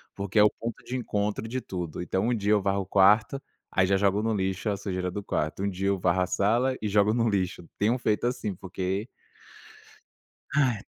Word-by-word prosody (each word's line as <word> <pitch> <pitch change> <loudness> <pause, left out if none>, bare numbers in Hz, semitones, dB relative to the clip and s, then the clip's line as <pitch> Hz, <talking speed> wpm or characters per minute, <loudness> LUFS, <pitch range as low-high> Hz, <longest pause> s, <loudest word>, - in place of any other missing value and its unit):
porque 100 +1 -4
é - - +8
o 105 - +6
ponto 115 +2 -7
de 125 - -5
encontro 105 -2 -2
de 130 +3 -3
tudo. 90 -6 -5
Então 95 +4 -1
um - - +2
dia 105 -2 0
eu 105 -1 +4
varro 100 +1 0
o - - -6
quarto, 105 +8 +4 0.3
aí 95 - +3
já 100 - +3
jogo 100 +1 +2
no 110 0 0
lixo 95 +1 -1
a 100 - 0
sujeira 95 -2 -3
do 105 +2 -5
quarto, 80 +1 -2
um 100 - +1
dia 95 0 -3
eu 100 0 +2
varro 90 0 +1
a 90 - +1
sala 120 +8 +1
e 105 - -1
jogo 105 +1 +3
no 115 0 +2
lixo. 95 -4 -2
Tenho 110 +5 +2
feito 110 -2 0
assim, 110 -4 -2
porque 95 +3 -3 1.5
Ai! 130 -8 +2
100 Hz, 215 wpm, -27 LUFS, 95-110 Hz, 1.5 s, é